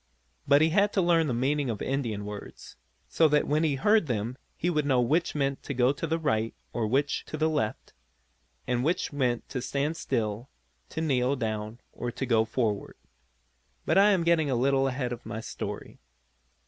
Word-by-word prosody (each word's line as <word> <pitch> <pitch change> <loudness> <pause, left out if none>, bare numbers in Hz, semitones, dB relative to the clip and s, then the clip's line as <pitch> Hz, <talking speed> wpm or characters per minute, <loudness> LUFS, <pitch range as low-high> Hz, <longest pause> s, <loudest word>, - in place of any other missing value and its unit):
But 140 +2 +6
he 160 - +4
had 200 +5 +3
to 195 - +2
learn 165 -2 +3
the 130 - -1
meaning 140 +2 0
of 110 -3 -3
Indian 115 -7 -2
words, 105 0 -9 0.3
so 160 - +3
that 150 0 +2
when 150 +2 +1
he 150 -3 +2
heard 210 +5 +3
them 120 0 -2 0.2
he 175 - -1
would 155 -4 +1
know 135 -3 +2
which 155 +9 +1
meant 140 -2 -1 0.2
go 125 +2 +4
to 165 - -4
the 165 +1 0
right 115 -8 -1 0.2
or 115 -2 -1
which 140 +5 0
to 155 - -6
the 155 +1 +2
left, 110 -8 -2 0.7
and 125 0 0
which 160 0 0
meant 125 -4 0
to 125 - -3
stand 140 +5 -1
still, 115 -4 -2 0.4
to 160 - -4
kneel 135 -3 +1
down 110 -1 -4
or 120 - -4
to 135 - -3
go 115 -3 +3
forward. 110 -3 -2 0.9
But - - +4
I 205 +1 +6
am 190 -4 +3
getting 165 -3 +3
a 130 - +1
little 135 +2 +2
ahead 130 -2 -2
of 120 - -9
my 110 - -5
story. 115 - -6
135 Hz, 190 wpm, -28 LUFS, 120-155 Hz, 0.9 s, But